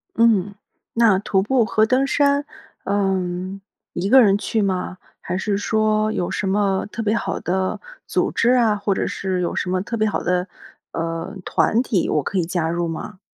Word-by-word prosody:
嗯， 210 -4 +3 0.4
那 230 -4 +4
徒 195 -1 +1
步 240 +4 +2
和 215 +1 +2
登 255 +4 +2
山， 280 +1 +2 0.4
呃， 195 -1 +1 0.8
一 185 +3 -2
个 260 +3 +8
人 200 -4 +4
去 220 +1 -1
吗？ 185 -2 -2 0.2
还 180 - -3
是 200 +1 -1
说 215 +1 +1
有 175 - -2
什 195 - -2
么 195 -1 +1
特 230 - -4
别 215 0 +1
好 - - -2
的 185 +1 -1 0.3
组 - - +1
织 230 - +2
啊， 235 -4 +3
或 205 -1 0
者 - - -1
是 190 -2 -2
有 175 - -2
什 180 - -2
么 185 0 0
特 220 +4 -4
别 215 -1 +1
好 - - -2
的， 180 +1 0 0.4
呃， 165 0 -4
团 225 - +2
体， 210 -8 0
我 150 - +1
可 195 - -3
以 180 - +2
加 175 -2 -1
入 170 +1 -1
吗？ 185 +4 -7
200 Hz, 205 characters per minute, -21 LUFS, 185-220 Hz, 0.8 s, 个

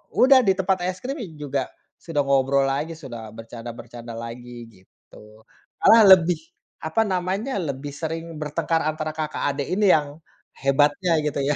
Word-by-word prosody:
udah 260 +1 +7
di 190 - +5
tempat 190 0 +1
es 185 0 -4
krim 275 +4 -4 0.2
juga 140 -2 -3 0.3
sudah 155 -4 -1
ngobrol 135 0 +2
lagi 145 +5 -2
sudah 115 -7 -9
bercanda-bercanda 115 +1 -9
lagi 120 0 -8
gitu, 105 +3 -19 0.4
malah 220 +1 +8 0.2
lebih 170 0 -1 0.5
apa 160 +8 0
namanya, 190 +7 -2
lebih 145 -4 -4
sering 165 +1 -5
bertengkar 160 +2 -1
antara 155 0 -2
kakak 155 -1 -4
adek 140 -1 -3
ini 205 0 +3
yang 145 0 -3 0.4
hebatnya 145 +5 +2
gitu 145 -1 -1
ya 145 +1 +1
150 Hz, 145 wpm, -23 LUFS, 130-170 Hz, 0.5 s, malah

